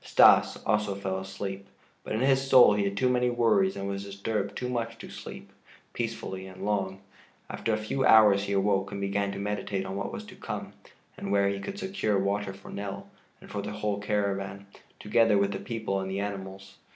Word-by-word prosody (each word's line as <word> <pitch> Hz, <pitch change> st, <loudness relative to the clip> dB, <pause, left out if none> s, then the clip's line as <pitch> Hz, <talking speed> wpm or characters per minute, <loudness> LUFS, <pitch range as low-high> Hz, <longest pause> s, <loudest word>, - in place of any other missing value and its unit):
Stas -, -, +6 dB
also 105 Hz, -2 st, +1 dB
fell 95 Hz, -1 st, -3 dB
asleep, 95 Hz, +1 st, -6 dB, 0.4 s
but -, -, -5 dB
in 110 Hz, -, 0 dB
his 135 Hz, 0 st, +4 dB
soul 125 Hz, -5 st, +8 dB
he 100 Hz, -1 st, +1 dB
had 100 Hz, 0 st, -2 dB
too 130 Hz, -, +3 dB
many 125 Hz, 0 st, +2 dB
worries 110 Hz, -6 st, +3 dB
and 100 Hz, 0 st, -4 dB
was 100 Hz, 0 st, -3 dB
disturbed 100 Hz, +1 st, -3 dB
too 125 Hz, -, -3 dB
much 115 Hz, -2 st, -3 dB
to -, -, -10 dB
sleep -, -, -9 dB, 0.4 s
peacefully 110 Hz, -5 st, -4 dB
and 95 Hz, +1 st, -8 dB
long. 95 Hz, -2 st, -1 dB, 0.5 s
After 115 Hz, -, -2 dB
a 110 Hz, -, +2 dB
few 110 Hz, +5 st, -2 dB
hours 105 Hz, -4 st, +6 dB
he 100 Hz, -, -2 dB
awoke 100 Hz, 0 st, +1 dB
and 100 Hz, -, -4 dB
began 100 Hz, 0 st, -1 dB
to -, -, -6 dB
meditate 100 Hz, -1 st, -2 dB
on 95 Hz, -, -5 dB
what 100 Hz, -, -3 dB
was -, -, -6 dB
to -, -, -12 dB
come, -, -, -6 dB, 0.4 s
and 100 Hz, -, -4 dB
where 100 Hz, 0 st, +3 dB
he 100 Hz, 0 st, -2 dB
could 200 Hz, -, -6 dB
secure 190 Hz, -, -1 dB
water 100 Hz, +1 st, 0 dB
for 100 Hz, +1 st, -12 dB
Nell, 100 Hz, -1 st, -6 dB, 0.3 s
and -, -, -14 dB
for -, -, -3 dB
the -, -, -5 dB
whole 105 Hz, -1 st, -2 dB
caravan, 100 Hz, -1 st, -2 dB, 0.3 s
together 110 Hz, 0 st, +3 dB
with 100 Hz, 0 st, +2 dB
the 100 Hz, -, -4 dB
people 110 Hz, -5 st, -2 dB
and 95 Hz, 0 st, -4 dB
the 95 Hz, +1 st, -2 dB
animals. 95 Hz, -1 st, -6 dB
100 Hz, 205 wpm, -28 LUFS, 100-110 Hz, 0.5 s, soul